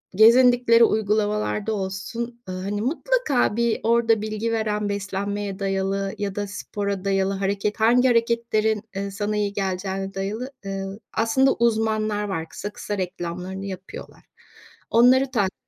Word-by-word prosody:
gezindikleri 235 Hz, +1 st, +6 dB
uygulamalarda 210 Hz, 0 st, +1 dB
olsun, 220 Hz, +5 st, -4 dB
ııı, 185 Hz, 0 st, -4 dB
hani, 205 Hz, +1 st, -2 dB
mutlaka 295 Hz, -, +1 dB
bir 235 Hz, -1 st, +1 dB
orada 230 Hz, -1 st, +3 dB
bilgi 215 Hz, +1 st, -2 dB
veren 210 Hz, -2 st, -1 dB
beslenmeye 200 Hz, 0 st, -3 dB
dayalı 195 Hz, 0 st, -1 dB
ya 200 Hz, -2 st, -3 dB
da 205 Hz, 0 st, -2 dB
spora 200 Hz, 0 st, -4 dB
dayalı 195 Hz, 0 st, +1 dB
hareket 200 Hz, +2 st, -1 dB
hangi 245 Hz, +3 st, +4 dB
hareketlerin, 230 Hz, -3 st, +1 dB
eee, 200 Hz, 0 st, -3 dB
sana 210 Hz, +1 st, -2 dB
iyi 205 Hz, -1 st, -1 dB
geleceğine 195 Hz, 0 st, -3 dB
dayalı, 210 Hz, +7 st, -4 dB
eee, 195 Hz, 0 st, -3 dB, 0.3 s
aslında 265 Hz, +4 st, +3 dB
uzmanlar 215 Hz, -2 st, +1 dB
var. 165 Hz, -5 st, -3 dB
Kısa 205 Hz, -, -6 dB
kısa 205 Hz, -, -4 dB
reklamlarını 185 Hz, +1 st, -4 dB
yapıyorlar. 190 Hz, -1 st, -9 dB, 0.7 s
Onları 255 Hz, +3 st, +5 dB
takip 200 Hz, -6 st, 0 dB
210 Hz, 130 wpm, -23 LUFS, 195-230 Hz, 0.7 s, gezindikleri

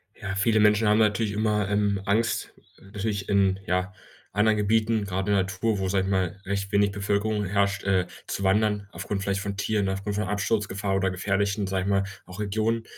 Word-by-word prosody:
Ja, 100 Hz, 0 st, -5 dB
viele 110 Hz, +2 st, +3 dB
Menschen 105 Hz, +1 st, +4 dB
haben 105 Hz, +1 st, +4 dB
natürlich 110 Hz, 0 st, +2 dB
immer, 105 Hz, -1 st, 0 dB
ähm, 100 Hz, -1 st, +1 dB
Angst, 115 Hz, +3 st, 0 dB, 0.3 s
natürlich 100 Hz, 0 st, -4 dB
in, 95 Hz, -1 st, +3 dB
ja, 90 Hz, +2 st, -1 dB, 0.4 s
anderen 105 Hz, +2 st, +3 dB
Gebieten, 110 Hz, +1 st, +1 dB
grad 95 Hz, 0 st, -2 dB
in 105 Hz, -, +2 dB
der 95 Hz, -1 st, +3 dB
Natur, 95 Hz, +3 st, -1 dB
wo, 95 Hz, -, -1 dB
sage 95 Hz, 0 st, +1 dB
ich -, -, -2 dB
mal, 95 Hz, 0 st, 0 dB
recht 100 Hz, 0 st, -2 dB
wenig 100 Hz, 0 st, +3 dB
Bevölkerung 105 Hz, +1 st, -1 dB
herrscht, 100 Hz, 0 st, 0 dB
äh, 95 Hz, -2 st, +2 dB, 0.2 s
zu 100 Hz, -, -3 dB
wandern 105 Hz, +1 st, +2 dB
aufgrund 100 Hz, -2 st, -4 dB
vielleicht 100 Hz, 0 st, -1 dB
von 100 Hz, -1 st, -4 dB
Tieren, 100 Hz, -1 st, 0 dB
aufgrund 100 Hz, +2 st, -3 dB
von 105 Hz, -, -1 dB
Absturzgefahr 100 Hz, 0 st, -1 dB
oder 95 Hz, 0 st, +1 dB
gefährlichen, 100 Hz, +2 st, 0 dB
sage 95 Hz, -1 st, -1 dB
ich 100 Hz, -, -2 dB
mal, 100 Hz, -1 st, +2 dB, 0.2 s
auch 90 Hz, +2 st, -11 dB
Regionen. 110 Hz, +2 st, 0 dB
100 Hz, 195 wpm, -26 LUFS, 95-105 Hz, 0.4 s, Menschen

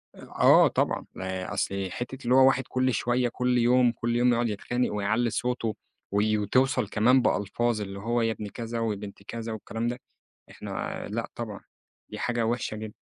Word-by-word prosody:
آه -, -, +5 dB
طبعًا، -, -, 0 dB, 0.2 s
آآ 95 Hz, 0 st, -4 dB
أصل 95 Hz, -1 st, -2 dB
حتّة 130 Hz, +2 st, -6 dB
اللي 125 Hz, +2 st, +3 dB
هو 130 Hz, 0 st, +7 dB
واحد 135 Hz, 0 st, +3 dB
كل 130 Hz, -1 st, +1 dB
شويّة، 120 Hz, +3 st, +1 dB
كل 125 Hz, +1 st, 0 dB
يوم، 120 Hz, 0 st, +4 dB
كل 120 Hz, 0 st, -2 dB
يوم 120 Hz, +1 st, +4 dB
يقعد 120 Hz, -1 st, +1 dB
يتخانق، 120 Hz, +4 st, -1 dB
ويعلّي 110 Hz, +4 st, +1 dB
صوته، 120 Hz, -3 st, -2 dB, 0.4 s
وي 105 Hz, +1 st, +2 dB
وتوصل 125 Hz, +2 st, +2 dB
كمان 125 Hz, +6 st, +4 dB
بألفاظ 110 Hz, +1 st, 0 dB
اللي 100 Hz, -1 st, -6 dB
هو 120 Hz, +3 st, 0 dB
يا 115 Hz, 0 st, +1 dB
ابن 105 Hz, -1 st, -5 dB
كذا، 115 Hz, +2 st, -5 dB
ويا 115 Hz, -2 st, 0 dB
بنت 100 Hz, -1 st, -9 dB
كذا، 115 Hz, +2 st, -6 dB
والكلام 115 Hz, +2 st, -4 dB
ده، 120 Hz, +1 st, -3 dB, 0.5 s
إحنا -, -, -5 dB
لأ -, -, -3 dB
طبعًا -, -, -5 dB, 0.5 s
دي -, -, -7 dB
حاجة 120 Hz, -1 st, 0 dB
وحشة 115 Hz, -1 st, -1 dB
جدًا. 110 Hz, -1 st, -7 dB
115 Hz, 180 wpm, -27 LUFS, 105-125 Hz, 0.5 s, هو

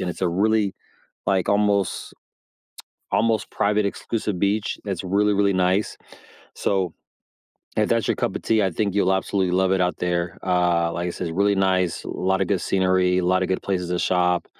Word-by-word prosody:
and 90 Hz, -, -2 dB
it's -, -, -9 dB
a -, -, +3 dB
really, 100 Hz, +2 st, +1 dB, 0.5 s
like, 95 Hz, -2 st, +1 dB
almost 100 Hz, -1 st, +1 dB, 1.0 s
almost 110 Hz, -2 st, +1 dB
private 105 Hz, 0 st, +1 dB
exclusive 105 Hz, -1 st, -3 dB
beach 100 Hz, +2 st, 0 dB
that's 95 Hz, -4 st, -4 dB
really, 100 Hz, +3 st, +2 dB
really 100 Hz, 0 st, +2 dB
nice, 95 Hz, +2 st, +1 dB, 0.6 s
so 95 Hz, -4 st, -1 dB, 0.8 s
if -, -, +2 dB
that's -, -, +1 dB
your -, -, +2 dB
cup -, -, -2 dB
of -, -, -6 dB
tea, 110 Hz, -2 st, +2 dB
I 95 Hz, -, +1 dB
think 100 Hz, +3 st, -2 dB
you'll 95 Hz, -2 st, +2 dB
absolutely 95 Hz, -1 st, 0 dB
love 95 Hz, 0 st, +2 dB
it 95 Hz, -, +1 dB
out 90 Hz, 0 st, +1 dB
there, 85 Hz, -1 st, -2 dB
uh, 85 Hz, -2 st, +2 dB
like 85 Hz, +1 st, -3 dB
I -, -, -2 dB
says, 85 Hz, -, -4 dB
it's 80 Hz, -, -7 dB
really 100 Hz, +1 st, +3 dB
nice, 95 Hz, -2 st, +1 dB
a -, -, -6 dB
lotta 95 Hz, +1 st, 0 dB
good 95 Hz, -2 st, 0 dB
scenery, 95 Hz, -1 st, +2 dB
a 90 Hz, -, 0 dB
lotta 95 Hz, 0 st, +2 dB
good 95 Hz, -, -1 dB
places 90 Hz, -3 st, -2 dB
to 90 Hz, -, 0 dB
shop, 90 Hz, -1 st, +1 dB
95 Hz, 190 wpm, -23 LUFS, 90-100 Hz, 1.0 s, a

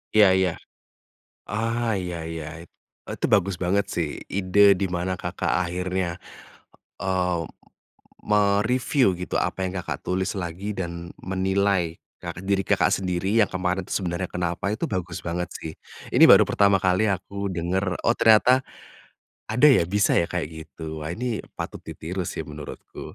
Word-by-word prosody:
Iya 105 Hz, -2 st, +8 dB
iya, 95 Hz, -1 st, +2 dB, 1.0 s
ah, 115 Hz, +2 st, -1 dB
iya 90 Hz, -2 st, -4 dB
iya. 80 Hz, -2 st, -5 dB, 0.6 s
E -, -, -8 dB
itu -, -, +1 dB
bagus 95 Hz, -2 st, +1 dB
banget 100 Hz, +2 st, 0 dB
sih 85 Hz, -3 st, -1 dB, 0.2 s
ide 100 Hz, +1 st, +4 dB
di 100 Hz, -, 0 dB
mana 90 Hz, 0 st, -2 dB
Kakak -, -, -3 dB, 0.2 s
akhirnya, 90 Hz, 0 st, -3 dB, 0.7 s
eee, 90 Hz, -2 st, 0 dB, 0.8 s
me-review 105 Hz, +6 st, +2 dB, 0.2 s
gitu 90 Hz, -, -3 dB
apa -, -, -1 dB
yang 95 Hz, -, -6 dB
Kakak 90 Hz, -, -4 dB
tulis 95 Hz, +1 st, -1 dB
lagi 95 Hz, +2 st, -4 dB
dan 85 Hz, -2 st, -5 dB
menilai 95 Hz, -2 st, 0 dB, 0.2 s
ka 85 Hz, -, -3 dB
diri 95 Hz, 0 st, 0 dB
Kakak -, -, +3 dB
sendiri 95 Hz, +3 st, -1 dB
yang 105 Hz, -, +4 dB
kemarin 90 Hz, 0 st, -1 dB
tuh -, -, -9 dB
sebenarnya 90 Hz, 0 st, -2 dB
kenapa 90 Hz, +3 st, -2 dB
itu 110 Hz, -, -2 dB
bagus 90 Hz, -3 st, -3 dB
banget 90 Hz, +1 st, -2 dB
sih 80 Hz, -, -6 dB, 0.4 s
ini -, -, +7 dB
baru -, -, +9 dB
pertama 100 Hz, -1 st, +3 dB
kali 95 Hz, +3 st, +2 dB
aku 100 Hz, +1 st, -3 dB
dengar 90 Hz, +1 st, -1 dB
oh 115 Hz, -, +3 dB
ternyata, 120 Hz, +4 st, +5 dB, 0.9 s
ada 125 Hz, +7 st, +5 dB
ya 120 Hz, -, +5 dB
bisa 100 Hz, +2 st, +2 dB
ya 85 Hz, -, +2 dB
kayak 90 Hz, -3 st, -2 dB, 0.2 s
gitu 80 Hz, -1 st, -7 dB
wah 75 Hz, -, -4 dB
ini 120 Hz, +1 st, -2 dB, 0.2 s
patut -, -, -5 dB
ditiru 90 Hz, +4 st, -5 dB
sih -, -, -4 dB
menurutku. 75 Hz, -1 st, -9 dB
95 Hz, 150 wpm, -24 LUFS, 85-100 Hz, 1.0 s, baru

